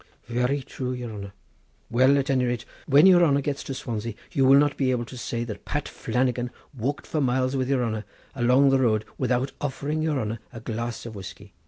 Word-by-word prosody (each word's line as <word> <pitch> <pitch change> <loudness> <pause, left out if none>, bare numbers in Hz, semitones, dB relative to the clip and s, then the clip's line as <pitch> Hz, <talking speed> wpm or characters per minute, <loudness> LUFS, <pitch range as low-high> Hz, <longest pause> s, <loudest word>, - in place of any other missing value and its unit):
"Very 125 +4 0
true, 130 0 -4
your 120 -3 -5
honour! 100 -1 -7 0.6
Well, 130 +4 +5
at 140 0 0
any 130 -2 +2
rate, 120 -1 -2 0.2
when 145 +3 +7
your 180 -2 +7
honour 140 -3 +3
gets 140 0 -3
to 135 - -4
Swansea 115 -3 -4 0.2
you 135 - +2
will 135 +1 +8
not 145 0 +3
be 135 -2 +1
able 120 -2 0
to 130 - -10
say 120 -1 -3
that 110 -3 -7
Pat - - -3
Flannagan 125 -1 -1 0.3
walked 135 +4 -2
for 155 - -1
miles 130 0 +1
with 130 -1 -1
your 130 -3 +2
honour 110 -1 -3 0.3
along 130 +2 +4
the 135 - +4
road 110 -3 +2
without 130 +1 +1
offering 145 +2 -2
your 155 -3 0
honour 110 -1 -3
a 115 - -8
glass 115 +1 -4
of 115 - -7
whiskey." 100 0 -10
125 Hz, 210 wpm, -25 LUFS, 115-140 Hz, 0.6 s, will